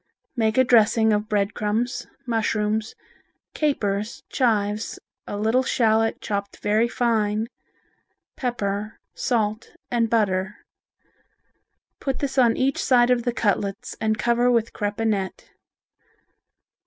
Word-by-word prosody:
Make 220 -1 +1
a 260 - +7
dressing 220 -2 +4
of 210 +1 -1
bread 205 -1 +1
crumbs, 220 +4 -2 0.2
mushrooms, 215 -2 -1 0.6
capers, 215 -8 -1
chives, 215 -4 0 0.3
a 205 - -4
little 220 +5 +2
shallot 225 -3 +2
all - - -36
chopped 200 -1 -3
very 215 +3 +2
fine, 220 -3 0 0.9
pepper, 215 -5 -3 0.2
salt 220 -2 -1 0.2
and 230 -2 +1
butter. 205 -2 +1 1.4
Put 270 -2 -2
this 275 -1 -1
on 235 -3 +4
each 270 +1 +1
side 245 -1 +4
of 240 -2 +1
the 245 - +2
cutlets 205 -4 -1
and 220 0 +1
cover 240 +2 +2
with 230 -2 +1
crepinette. 205 -2 -2
220 Hz, 115 wpm, -24 LUFS, 210-240 Hz, 1.4 s, a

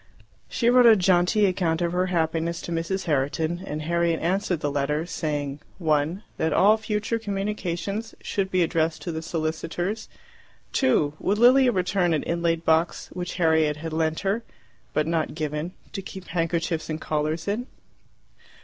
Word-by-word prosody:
She 235 - 0
wrote 245 0 +7
a 225 - +9
jaunty 185 +2 +3
account 180 -4 +1
of 170 -1 0
her 180 +1 +1
happiness 170 -1 0
to - - -6
Mrs. 170 +3 -1
Herriton, 160 +3 0
and 155 -4 -4
Harriet 170 0 +1
answered 185 0 0
the 145 - -1
letter, 145 +3 0
saying 145 -4 -3 0.2
(1) 160 +3 0
that 160 0 0
all 205 +7 +5
future 220 +1 -2
communications 200 0 -3
should 195 -1 -2
be 185 -2 +2
addressed 160 -1 0
to 170 - -3
the 160 0 -4
solicitors; 165 +5 -3 0.6
(2) 230 - +2
would 200 +2 0
Lilia 250 +2 +6
return 180 -3 +1
an 150 - -1
inlaid 170 -1 0
box 160 +1 +1
which 180 0 -4
Harriet 160 -3 +2
had 160 +1 -6
lent 160 0 0
her 200 +4 0 0.5
but 155 - +1
not 165 -2 -1
given 155 +2 -3 0.2
to 195 - -3
keep 190 0 -9
handkerchiefs 165 -1 -1
and 155 0 -3
collars 155 +2 -2
in? 225 +5 -1
170 Hz, 160 wpm, -25 LUFS, 160-195 Hz, 0.6 s, a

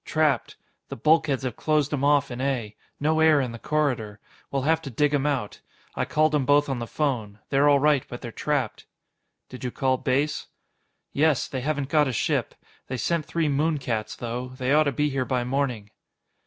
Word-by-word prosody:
"Trapped. 155 -3 0 0.3
The - - -5
bulkheads 150 0 +2
have 125 -4 -3
closed 150 -2 +1
'em 140 -2 -1
off 145 -2 +3
in 120 +1 -5
A. 125 -6 -2 0.2
No 155 +2 +1
air 160 -2 +5
in 130 -3 -1
the 115 - -8
corridor. 125 -10 -1 0.3
We'll 135 -1 -1
have 160 +2 +2
to 140 - -7
dig 145 +4 +1
'em 145 0 +1
out. 130 -8 -2 0.3
I - - -1
called 155 0 +2
'em 150 -2 +2
both 145 +2 +3
on 135 -2 -2
the 115 - -4
phone. 115 -10 -2
They're 140 +1 +4
all 145 - +6
right, 145 -1 +3
but 120 - -8
they're 120 - -6
trapped." 140 -3 -2 0.6
"Did 125 - -10
you 125 - -1
call 130 +1 0
Base?" 140 +4 -1 0.7
"Yes. 150 -2 +2
They 130 - -4
haven't 145 0 -2
got 150 -1 +3
a 130 - -2
ship. - - -1 0.3
They 130 - -3
sent 165 +4 -1
three 165 -2 0
moon 150 +2 +1
cats, 110 -5 -3
though. 120 +1 -4
They 130 +1 0
ought 155 +1 +5
to 145 - +1
be 150 +3 0
here 135 -1 0
by 125 -1 -1
morning." 125 -5 -2
140 Hz, 205 wpm, -25 LUFS, 125-150 Hz, 0.7 s, all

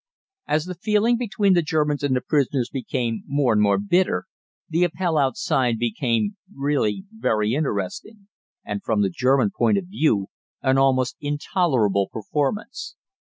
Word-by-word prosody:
As 155 +1 +1
the 180 - -5
feeling 210 +6 +2
between 210 -4 +1
the 175 - +4
Germans 150 -2 0
and 140 -2 +1
the 125 - 0
prisoners 135 -4 0
became 120 -4 -2
more 140 -4 +2
and 105 - +3
more 100 -1 +3
bitter, 185 - +1 0.4
the 165 +2 +1
Appell 175 -1 0
outside 130 -3 +1
became 120 - -1
really 140 - -1
very 110 - 0
exciting, 150 - -3 0.4
and 105 -1 -4
from 105 -2 +1
the 95 - 0
German 130 0 +2
point 210 - +3
of 195 - -2
view 150 - 0 0.3
an 135 0 +3
almost 130 -2 +2
intolerable 145 - +1
performance. 150 - -3
140 Hz, 145 wpm, -23 LUFS, 115-180 Hz, 0.4 s, the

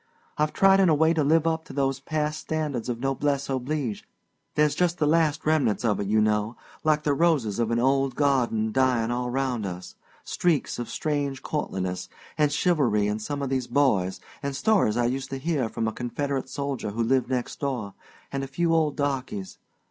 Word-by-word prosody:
I've 150 0 +1
tried 195 0 +5
in 190 -3 +5
a 155 - +5
way 160 +2 +4
to 160 -2 +1
live 160 +3 +3
up 160 0 0
to - - -10
those 135 -1 0
past 150 +1 -2
standards 150 -7 -3
of 120 -1 -2
noblesse 135 +1 0
oblige 130 -3 -2 0.5
there's 150 -1 +3
just 175 +2 +1
the 155 - +1
last 155 0 +2
remnants 140 -8 +2
of 105 -2 +1
it, 100 - -2
you 110 +2 +3
know, 105 +1 +1 0.3
like 155 -1 +2
the 145 - +2
roses 140 -10 +1
of 115 -2 +1
an 115 - +1
old 135 +1 +2
garden 125 -6 +1
dying 125 -2 +2
all 125 0 -1
round 125 -3 -1
us 90 -2 -6 0.3
streaks 165 -8 0
of 120 - -4
strange 145 -3 -2
courtliness 95 -11 -3 0.3
and 150 -1 +2
chivalry 145 - +2
in 105 +1 -1
some 140 +6 -4
of 135 - -2
these 130 -2 -1
boys 105 -10 +2 0.2
an' 140 0 -3
stories 140 - +2
I 120 - +2
used 130 +2 -2
to 135 - -4
hear 135 -4 -1
from 115 0 -2
a 110 - -2
Confederate 135 +3 -3
soldier 140 -4 -3
who 115 +3 -1
lived 130 +1 +1
next 125 -2 -2
door, 125 -8 -3 0.4
and 135 0 -2
a - - -4
few 165 +5 0
old 155 -3 +2
darkies. 130 -9 -3
135 Hz, 195 wpm, -26 LUFS, 120-150 Hz, 0.5 s, tried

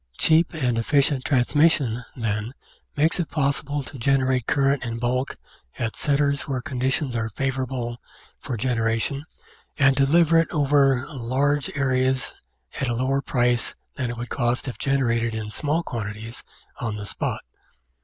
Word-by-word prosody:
Cheap 165 +1 +4
and 125 -6 0
efficient 140 +2 +2
transmission, 130 -2 +2
then, 110 +1 -2 0.4
makes 160 +4 +3
it 170 - -1
possible 145 -1 0
to 130 - -10
generate 130 -1 +2
current 140 -2 +2
in 115 -1 -3
bulk 125 +3 -1 0.4
at 115 -1 -2
centres 140 -1 +1
where 135 -3 -1
conditions 130 0 -1
are 110 -1 -1
favour 135 +4 -1
able 120 -2 -4 0.4
for 120 - -4
generation 115 +3 0 0.5
and 135 -2 +5
to 135 -1 +4
deliver 165 +2 +5
it 165 - +1
over 140 -4 +3
large 140 +1 0
areas 130 -1 +1 0.5
at 135 - 0
a 120 - 0
lower 135 +3 +1
price 120 -3 0 0.2
than 130 -3 -2
it 120 - -5
would 120 +1 -5
cost 120 +1 0
if 125 - -6
generated 115 -4 +1
in 110 -1 -4
small 150 +7 0
quantities 110 -1 -6 0.3
on 115 -3 -3
the 105 -1 -6
spot. - - -3
130 Hz, 150 wpm, -24 LUFS, 120-140 Hz, 0.5 s, and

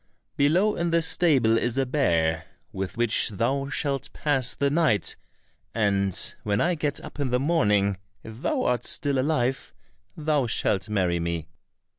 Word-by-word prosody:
Below, 175 +9 +2
in 170 0 0
the 165 0 +2
stable 135 -10 +3
is 120 +1 -2
a 135 - +2
bear 85 - 0 0.3
with 95 +4 -5
which 120 -2 +3
thou 135 +7 -1
shalt 140 -2 -2
pass 135 -5 0
the 140 0 0
night, 155 -9 +1 0.6
and 100 -4 0
when 105 0 -1
I 175 +8 +2
get 150 -3 -2
up - - -11
in 140 -2 -1
the 125 +1 +1
morning 105 - +2 0.3
if 110 +2 -11
thou 265 - 0
art 120 -1 0
still 140 -2 +1
alive, 135 -2 -1 0.4
thou 150 -4 0
shalt 100 -3 0
marry 90 -5 0
me." 85 -1 -3
125 Hz, 155 wpm, -25 LUFS, 105-150 Hz, 0.6 s, stable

